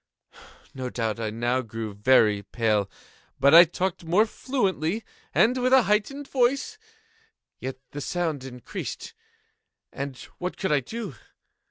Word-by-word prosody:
No 130 -1 -4
doubt 115 -2 -2
I 110 -1 -2
now 120 +4 0
grew 115 -3 -6
very 105 -1 +4
pale;—but 110 +6 -1
I 170 +2 +11
talked 175 +2 -3
more 180 +7 +3
fluently, 215 - -1 0.3
and 250 +3 +3
with 255 +1 +2
a 265 -2 +7
heightened 225 +8 0
voice. 270 - 0 0.8
Yet 130 0 -5
the 145 - -6
sound 160 -4 -2
increased—and 130 +1 -9 0.2
what 180 +1 -4
could 190 - -1
I 150 - +4
do? 210 - -6
150 Hz, 125 wpm, -26 LUFS, -, 0.8 s, I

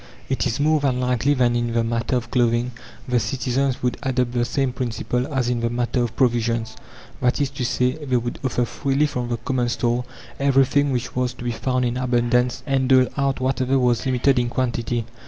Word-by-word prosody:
It - - 0
is 115 - -2
more 155 +1 +3
than 135 -3 0
likely 125 +3 +1
that 120 -2 +2
in 120 -1 -1
the 115 0 +2
matter 115 +2 -1
of 115 -1 -3
clothing 120 0 +2 0.4
the 125 -1 +2
citizens 130 +2 -1
would 125 -1 0
adopt 125 -2 0
the 120 -1 0
same 135 0 -1
principle 125 +1 -2
as 130 -3 0
in 120 -1 0
the 115 0 0
matter 120 +1 -1
of 120 -1 -2
provisions 115 -3 +1 0.5
that 125 -1 +2
is 140 -2 0
to 135 -2 -4
say, 125 +4 0
they 130 -3 +1
would 120 0 -3
offer 125 -2 0
freely 140 +3 0
from 125 -4 -3
the 120 - -1
common 120 +1 -1
store 120 +1 0 0.4
everything 140 +1 +3
which 125 -2 -3
was 125 0 0
to - - -9
be 120 - -1
found 125 +2 -1
in 120 +1 -1
abundance, 125 0 +1
and 135 -2 +1
dole 130 -1 +5
out 140 -2 0
whatever 130 0 +1
was 125 -1 +1
limited 130 +1 +2
in 120 -1 0
quantity. 120 -2 -1
125 Hz, 205 wpm, -22 LUFS, 120-130 Hz, 0.5 s, dole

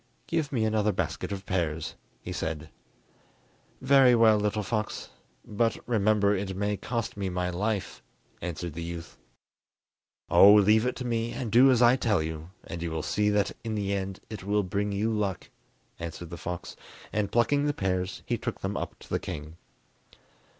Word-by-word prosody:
"Give 155 -4 -1
me 115 -5 +1
another 110 -1 +2
basket 95 0 -3
of 100 -1 -5
pears," 80 -4 -1 0.3
he - - -6
said. 80 -1 -4 1.1
"Very 130 -2 +6
well, 110 -2 +6
little 105 +1 0
fox; 105 +2 -3 0.4
but 115 +2 0
remember 105 -3 +3
it 95 -1 -3
may 100 +1 0
cost 115 +2 -3
me 100 -2 -2
my 90 0 -1
life," 100 +2 -2 0.4
answered 85 -1 -4
the 85 - -6
youth. 85 0 -7 1.1
"Oh, 100 +1 +8
leave 105 +3 +5
it 125 - -1
to 125 - -5
me, 115 -1 -1
and 120 -5 -4
do 125 +4 +7
as 125 -2 +4
I 120 +2 +6
tell 105 -10 +1
you, 80 +1 -6
and 85 - -7
you 85 - -2
will 80 -1 -3
see 105 0 +1
that 105 -1 +2
in 110 -2 -3
the 100 -1 -1
end 95 -1 -3
it 110 -4 -7
will 105 +1 +1
bring 100 +2 -1
you 105 +3 0
luck," 100 -5 -2 0.5
answered 85 0 -6
the - - -4
fox; 90 +1 -6 0.4
and 100 -2 0
plucking 140 +5 +3
the 145 - +2
pears 95 -2 -2
he - - -1
took - - -4
them - - -2
up - - -4
to - - -13
the - - 0
king. 75 +2 -7
100 Hz, 180 wpm, -28 LUFS, 90-110 Hz, 1.1 s, Oh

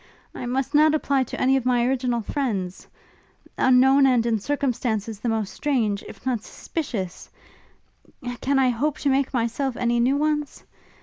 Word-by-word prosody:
I 245 - -6
must 265 +3 -2
not 305 +1 +5
apply 280 -3 +1
to - - -7
any 265 +1 +3
of 265 - -2
my 245 -1 +2
original 250 -2 0
friends: 205 -8 -3 0.7
unknown, 265 +2 +5
and 245 -3 +3
in 225 -2 +1
circumstances 230 -5 -2
the 235 - -2
most 220 -3 -2
strange, 230 -9 0
if - - -13
not 250 -4 0
suspicious, 215 - -5 1.1
can 275 +1 +1
I 265 -1 +4
hope 285 +5 -1
to 285 - +1
make 270 0 +1
myself 245 +2 -1
any 240 -1 +1
new 260 +4 +2
ones? 300 -1 -1
255 Hz, 160 wpm, -24 LUFS, 230-275 Hz, 1.1 s, not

